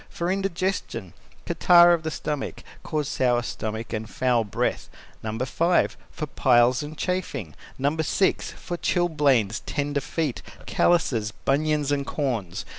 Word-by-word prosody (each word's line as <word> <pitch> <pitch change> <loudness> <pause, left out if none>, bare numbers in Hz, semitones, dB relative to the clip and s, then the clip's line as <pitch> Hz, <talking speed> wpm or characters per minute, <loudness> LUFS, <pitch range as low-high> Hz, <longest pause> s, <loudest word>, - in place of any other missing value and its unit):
For 170 +1 -2
indigestion 185 - -2 0.3
(catarrh 175 0 +6
of 170 - +1
the 160 - -3
stomach) 150 -2 -4 0.2
cause 150 -3 -2
sour 120 -3 +1
stomach 110 -1 -5
and 110 0 -4
foul 125 -2 +1
breath. 105 - -2 0.3
No. 110 0 -4
5. 165 +8 +1
For 155 - -5
piles 125 -3 +3
and 150 +1 -7
chafing. 150 - -3 0.2
No. 140 +3 +1
6. 160 +4 +1
For 175 -1 -6
Chilblains, 145 - +2
tender 145 -1 -1
feet, 150 -2 -2 0.2
callouses, 120 -11 +1
bunions, 150 +1 +1
and 140 -1 +1
corns. 115 - -2
145 Hz, 130 wpm, -25 LUFS, 120-165 Hz, 0.3 s, catarrh